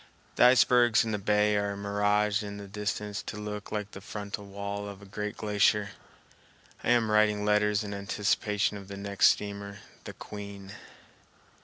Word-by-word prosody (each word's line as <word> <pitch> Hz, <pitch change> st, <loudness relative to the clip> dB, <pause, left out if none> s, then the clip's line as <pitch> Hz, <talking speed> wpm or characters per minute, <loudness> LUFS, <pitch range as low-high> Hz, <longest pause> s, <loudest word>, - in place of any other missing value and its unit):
The -, -, +5 dB
icebergs 125 Hz, -2 st, +5 dB
in 110 Hz, -, -2 dB
the 105 Hz, -, -1 dB
bay 105 Hz, +1 st, +2 dB
are 100 Hz, -1 st, -1 dB
miraged 105 Hz, +1 st, +1 dB
in 100 Hz, -1 st, -6 dB
the 100 Hz, -1 st, -8 dB
distance 105 Hz, 0 st, -3 dB
to 105 Hz, -, -7 dB
look 105 Hz, -1 st, -6 dB
like 105 Hz, -1 st, -3 dB
the 95 Hz, -, -10 dB
frontal 100 Hz, 0 st, -6 dB
wall 100 Hz, +1 st, -5 dB
of 100 Hz, -1 st, -10 dB
a 100 Hz, -, -13 dB
great 105 Hz, +1 st, -5 dB
glacier. 105 Hz, -1 st, +2 dB, 0.9 s
I -, -, -1 dB
am 120 Hz, -3 st, +3 dB
writing 105 Hz, -1 st, +3 dB
letters 105 Hz, 0 st, +2 dB
in 100 Hz, -1 st, -5 dB
anticipation 105 Hz, +1 st, 0 dB
of 100 Hz, -1 st, -11 dB
the 100 Hz, 0 st, -8 dB
next 100 Hz, 0 st, +3 dB
steamer, 100 Hz, -1 st, -1 dB, 0.3 s
the -, -, -7 dB
Queen. 100 Hz, -1 st, -9 dB
105 Hz, 165 wpm, -29 LUFS, 100-105 Hz, 0.9 s, The